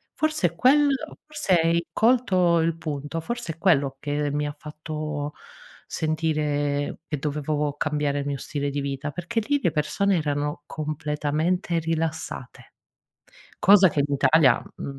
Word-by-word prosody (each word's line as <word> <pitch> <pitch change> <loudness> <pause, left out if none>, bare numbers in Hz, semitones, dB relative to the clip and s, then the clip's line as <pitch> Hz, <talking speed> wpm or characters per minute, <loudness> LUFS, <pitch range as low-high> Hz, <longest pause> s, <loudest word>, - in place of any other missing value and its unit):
forse 310 - +1
è 170 - -19
quello 285 - +3
forse 300 -11 0
hai 165 +1 +1
colto 190 -8 +3
il 165 0 0
punto, 150 0 -4
forse 235 -3 -4
è - - -25
quello 140 -8 +2
che 145 0 -1
mi 150 0 -1
ha 145 - -6
fatto 150 -1 -5 0.5
sentire 150 -3 -1
che 150 - -3
dovevo 150 0 -1
cambiare 150 -1 0
il 140 - -3
mio 140 -1 -2
stile 145 +1 -3
di 145 0 -2
vita, 140 +1 -3
perché 180 +8 -2
lì 285 0 +2
le 175 - +2
persone 190 +6 +1
erano 145 -1 -2
completamente 155 +4 -1
rilassate. 160 -5 -4 0.9
Cosa 195 -1 +7
che 150 - -1
in 145 - -4
italia, 140 -2 +4 0.2
mhmm, 140 -1 -6
155 Hz, 145 wpm, -25 LUFS, 145-175 Hz, 0.9 s, Cosa